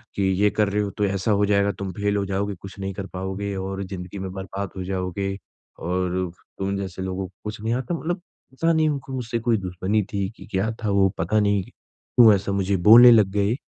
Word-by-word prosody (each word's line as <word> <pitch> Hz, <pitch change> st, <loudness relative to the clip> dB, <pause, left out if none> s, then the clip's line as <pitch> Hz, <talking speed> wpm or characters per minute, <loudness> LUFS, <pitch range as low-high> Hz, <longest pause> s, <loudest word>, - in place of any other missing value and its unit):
कि, 100 Hz, -, -1 dB
"ये 95 Hz, +2 st, +3 dB
कर 105 Hz, -1 st, +1 dB
रहे 105 Hz, +1 st, 0 dB
हो, 100 Hz, -, -2 dB
तो 105 Hz, -, -1 dB
ऐसा 100 Hz, +2 st, 0 dB
हो 100 Hz, 0 st, +3 dB
जाएगा, 100 Hz, 0 st, +2 dB
तुम 100 Hz, -1 st, -5 dB
फेल 100 Hz, +1 st, -1 dB
हो 100 Hz, -, 0 dB
जाओगे, 100 Hz, +1 st, -2 dB
कुछ 95 Hz, +3 st, -11 dB
नहीं 95 Hz, 0 st, -3 dB
कर 95 Hz, 0 st, -6 dB
पाओगे 95 Hz, +2 st, -3 dB
और 95 Hz, +1 st, -4 dB
ज़िंदगी 95 Hz, 0 st, -7 dB
में 95 Hz, -1 st, -5 dB
बर्बाद 95 Hz, 0 st, -5 dB
हो 95 Hz, -, -3 dB
जाओगे 95 Hz, +1 st, -3 dB, 0.4 s
और 90 Hz, 0 st, -1 dB, 0.3 s
तुम 100 Hz, +1 st, -1 dB
जैसे 95 Hz, -1 st, -5 dB
लोगों 95 Hz, 0 st, -3 dB
को 95 Hz, -, -23 dB
कुछ 105 Hz, 0 st, -6 dB
नहीं 115 Hz, +1 st, 0 dB
आता।" 130 Hz, +6 st, -2 dB
मतलब 175 Hz, +2 st, -3 dB, 0.3 s
पता 165 Hz, +5 st, +1 dB
नहीं, 160 Hz, -1 st, +3 dB
उनको 135 Hz, -2 st, -4 dB
मुझसे 120 Hz, -2 st, -2 dB
कोई 115 Hz, -1 st, +1 dB
दुश्मनी 95 Hz, +3 st, -1 dB
थी 100 Hz, -1 st, -1 dB
कि -, -, -11 dB
क्या 100 Hz, +3 st, 0 dB
था, 105 Hz, -, 0 dB
वो 100 Hz, -1 st, +4 dB
पता 105 Hz, +6 st, +1 dB
नहीं 100 Hz, -2 st, +2 dB
क्यों 115 Hz, +3 st, +2 dB
ऐसा 100 Hz, 0 st, -3 dB
मुझे 100 Hz, 0 st, +1 dB
बोलने 120 Hz, +2 st, +10 dB
लग 105 Hz, -4 st, +5 dB
गए? 105 Hz, +4 st, +1 dB
100 Hz, 225 wpm, -23 LUFS, 95-105 Hz, 0.4 s, बोलने